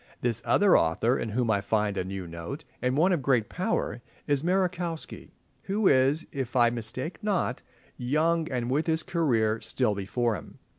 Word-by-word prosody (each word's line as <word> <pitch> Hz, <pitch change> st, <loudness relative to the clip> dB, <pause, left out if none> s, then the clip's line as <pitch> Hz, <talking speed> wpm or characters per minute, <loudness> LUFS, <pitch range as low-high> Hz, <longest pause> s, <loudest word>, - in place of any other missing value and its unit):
This 120 Hz, -1 st, 0 dB
other 200 Hz, -2 st, +5 dB
author, 85 Hz, +10 st, +2 dB
in 115 Hz, -, -2 dB
whom 115 Hz, +1 st, 0 dB
I 100 Hz, -2 st, +1 dB
find 105 Hz, 0 st, 0 dB
a 95 Hz, -, -1 dB
new 95 Hz, 0 st, -5 dB
note, 85 Hz, -, -7 dB, 0.2 s
and 125 Hz, +2 st, 0 dB
one 180 Hz, +5 st, +4 dB
of 175 Hz, -5 st, +1 dB
great 125 Hz, -5 st, +2 dB
power, -, -, -2 dB, 0.2 s
is 145 Hz, -2 st, +1 dB
Merejkowski, 180 Hz, -2 st, -2 dB, 0.4 s
who 200 Hz, +1 st, +1 dB
is, 135 Hz, +4 st, +3 dB
if 130 Hz, -3 st, -4 dB
I 120 Hz, -2 st, +5 dB
mistake 125 Hz, -, -5 dB
not, 190 Hz, -, 0 dB, 0.4 s
young 155 Hz, +6 st, +1 dB
and 125 Hz, -1 st, -2 dB
with 150 Hz, +5 st, +1 dB
his 160 Hz, 0 st, +1 dB
career 115 Hz, -, +1 dB
still 115 Hz, 0 st, 0 dB
before 110 Hz, +4 st, -1 dB
him. -, -, -8 dB
130 Hz, 175 wpm, -27 LUFS, 110-160 Hz, 0.4 s, other